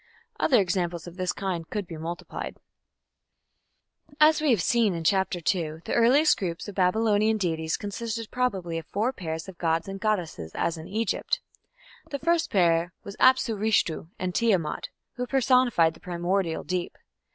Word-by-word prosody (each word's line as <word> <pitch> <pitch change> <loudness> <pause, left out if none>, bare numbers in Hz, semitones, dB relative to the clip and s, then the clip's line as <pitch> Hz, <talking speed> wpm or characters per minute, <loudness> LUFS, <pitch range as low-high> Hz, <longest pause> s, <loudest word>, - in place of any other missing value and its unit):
Other 250 - +4
examples 175 -3 -1
of 175 -1 -10
this 185 -1 -1
kind 180 -4 -4
could 210 -3 -3
be 170 -2 -8
multiplied. 165 +2 -6 1.6
As 305 0 +6
we 310 - +2
have 230 -6 +4
seen 200 -5 +1
(Chapter 190 +2 +2
II) 160 -2 -1
the - - -3
earliest 255 +7 +4
group 170 -1 -4
of 205 - -6
Babylonian 215 +3 +2
deities 160 -5 -1
consisted 225 +2 -5
probably 190 -10 -1
of 165 - -12
four 225 +6 -1
pairs 160 -5 -5
of 190 -3 -11
gods 165 0 0
and 195 0 -6
goddesses 175 - -2
as 170 - 0
in 160 0 -9
Egypt. 220 0 -1 0.7
The 285 - -3
first 330 +2 +1
pair 175 -4 +2
was 200 - -8
Apsu 255 -3 +4
Rishtu 200 -6 0
and 185 -1 -3
Tiamat, 185 -10 0 0.3
who 250 0 -2
personified 250 -11 +3
the - - -17
primordial 175 -1 -1
deep. 180 -1 -3
190 Hz, 155 wpm, -26 LUFS, 170-225 Hz, 1.6 s, As